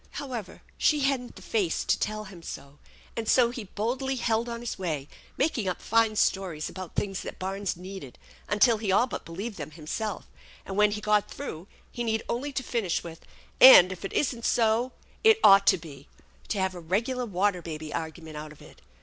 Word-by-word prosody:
However, 245 -9 -6 0.2
she 300 -2 +3
hadn't 270 -3 -1
the - - -12
fact 195 -7 -1
to - - +3
tell 215 0 -2
him 190 -4 -12
so; 140 -3 -9 0.4
and 225 -2 -3
so 240 -2 +4
he 240 -4 -6
boldly 250 +7 -2
held 235 -1 0
on 235 0 -5
his 240 -4 -5
way, 155 -7 -3 0.3
making 260 -8 0
up 185 - -2
fine 225 -1 +2
stories 185 -7 0
about 185 -2 -8
things 195 -2 -2
that - - -7
barns 195 0 -3
needed 185 -7 -9 0.3
until 220 +2 +4
he 210 -2 -3
ail 195 +6 +4
but 255 - -6
believed 195 +6 -6
them - - -5
himself; 170 +7 -5 0.4
and, 195 - -6
when 210 +1 +5
he 210 0 -4
got 210 -1 +2
through, 185 - -7 0.2
he 240 - -4
needed 220 -1 -1
only 270 +5 -2
to 265 -1 -3
finish 225 -8 -1
with 165 -1 -9 0.4
"And, 190 -8 +10
if 185 0 -8
it 195 - -5
isn't 245 -5 0
so, 230 +2 +2 0.3
it 445 0 +6
ought 195 0 +7
to - - +6
be 145 -4 -12 0.2
" - - -28
to 210 - -1
have 190 0 0
a 180 - -8
regular 235 +9 -1
Water 195 -1 0
Baby 155 -2 -6
argument 160 -1 -6
out 150 0 -7
of 150 - -15
it. - - -16
205 Hz, 200 wpm, -27 LUFS, 175-235 Hz, 0.4 s, And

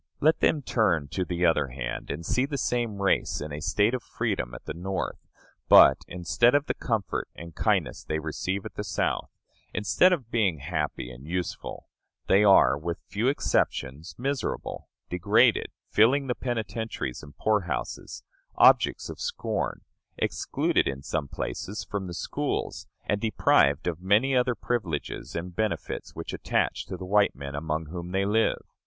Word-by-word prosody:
Let 155 +2 +3
them 150 -3 +2
turn 85 - +1
to 95 - -1
the 90 0 -1
other 75 -4 +3
hand, - - -5
and 75 +4 -4
they - - -7
see 125 - +2
the 140 -1 -3
same 120 -5 -1
race 100 - +1
in 75 0 -6
a 75 - -4
state 100 +7 +2
of 130 - -1
freedom - - -3
at - - -11
the - - -4
North; 95 +3 -4 0.4
but, - - +9
instead 90 +8 +2
of 145 0 +3
the - - -1
comfort 110 - -2
and 85 0 -9
kindness - - 0
they 80 - -2
receive 90 +5 -3
at - - -7
the - - -4
South, - - -1 0.5
instead 105 - +4
of 135 -10 -1
being 100 -8 +2
happy 65 -3 -3
and 65 +4 -12
useful, 90 +1 -4 0.4
they 100 +2 +5
are, 100 -8 +6
with 85 +2 -3
few 105 +7 0
exceptions, 80 - 0
miserable, 135 -1 -3 0.2
degraded, 90 -1 +3 0.2
filling 130 +6 +4
the 125 - 0
penitentiaries 110 - -3
and 75 -1 -14
poor 110 -2 +2
houses, - - -4 0.3
objects - - +5
of - - -8
scorn, - - -2 0.4
excluded - - 0
in 65 0 -4
some 75 -1 -2
places 95 - -5
from 100 -2 -3
the 85 - -6
schools, - - -3 0.2
and 105 0 0
deprived 70 -10 +3
of 85 -1 -2
many 105 +8 +3
other 125 -1 +2
privileges 95 -10 -3
and 85 +1 -5
benefits 110 +1 -3
which - - -6
attach - - -1
to - - -5
the 95 - -7
white 100 -3 +3
men 70 +1 -7
among 80 +2 -2
whom 85 +2 -6
they 95 +2 0
live. 110 +3 +1
95 Hz, 165 wpm, -27 LUFS, 80-115 Hz, 0.5 s, but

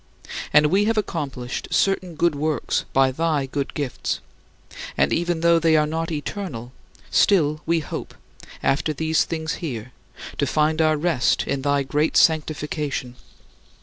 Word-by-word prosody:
And 150 0 +6
we 200 +2 +3
have 225 +1 +1
accomplished 140 -11 -3
certain 185 -3 +1
good 170 +1 +2
works 150 -1 -1
by 135 0 +4
thy 155 0 0
good 140 +1 -4
gifts, 140 -4 -2 0.8
and 70 - +3
even 170 -1 0
though 170 0 +5
they 160 -1 +4
are 150 - +3
not 165 +2 -3
eternal, 145 - -5 0.4
still 155 -6 +3
we 165 0 +2
hope, - - -6 0.5
after 155 +3 +1
these 160 +2 +1
things 160 -1 -3
here, 125 -7 -5 0.5
to 140 - +2
find 155 +3 +2
our 155 -1 +3
rest 160 -4 +1
in 140 - -2
thy 140 0 +1
great 150 +3 +1
sanctification. 150 -4 +1
155 Hz, 145 wpm, -23 LUFS, 140-165 Hz, 0.8 s, And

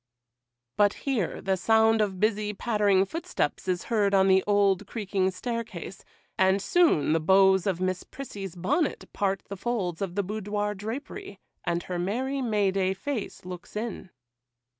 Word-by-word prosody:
But 205 0 +4
here 245 - -1
the 190 0 +1
sound 220 +3 +4
of 195 -3 -1
busy, 210 0 0
pattering 205 -4 +2
footsteps 330 - -3
is 180 -1 0
heard 205 -4 +2
on 190 0 +5
the 190 0 +5
old, 200 -1 +3
creaking 195 -4 -1
staircase, 205 -2 -5 0.4
and 190 +1 +4
soon 255 - +3
the 165 - +3
bows 190 +3 +4
of 185 -3 0
Miss 185 0 -1
Prissy's 200 -9 -8
bonnet 280 - 0
part 195 -1 -1
the 200 - -6
folds 190 -6 -2
of 185 -3 -3
the 200 - +1
boudoir 210 +1 -2
drapery, 265 - -7 0.2
and 170 0 -1
her 180 -1 -4
merry, 260 +9 -1
May 210 -5 +1
day 190 0 0
face 225 -3 -5
looks 180 +1 -9
in. 215 -3 -4
200 Hz, 155 wpm, -27 LUFS, 190-220 Hz, 0.4 s, on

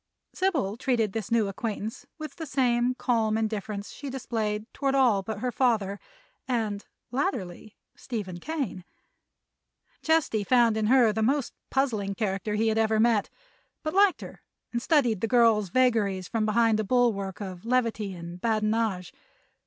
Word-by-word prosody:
Sybil 290 - 0
treated 235 -6 0
this 220 -3 -4
new 225 -3 +3
acquaintance 220 +3 -5
with 310 -3 -8
the 320 -2 -6
same 250 -2 +1
calm 225 -4 +1
indifference 210 -2 -3
she 285 - -7
displayed 220 -5 -3
toward 275 -1 0
all 245 -7 +4
but 210 +1 -6
her 250 0 -1
father 215 -6 +1 0.5
and, 220 -5 -2 0.2
latterly, 215 -7 -3 0.2
Stephen 200 -8 -5
Kane. 275 - -4 1.2
Chesty 315 -10 +1
found 235 0 +4
in 215 -1 0
her 240 -3 +5
the 220 - -1
most 270 +4 +1 0.2
puzzling 220 -8 0
character 210 0 -2
he 220 +1 +2
had 220 0 +1
ever 220 -1 +2
met, 225 -2 +3 0.5
but 310 - -2
liked 395 -1 +4
her - - -10 0.3
and 235 - -1
studied 250 - +2
the 225 - +1
girl's 225 -5 +4
vagaries 205 -6 +1
from 220 -2 -1
behind 225 0 +3
a - - +1
bulwark 205 -5 +1
of 185 -3 -7
levity 230 -5 0
and 170 +1 -9
badinage. 215 -4 0
225 Hz, 150 wpm, -27 LUFS, 205-250 Hz, 1.2 s, her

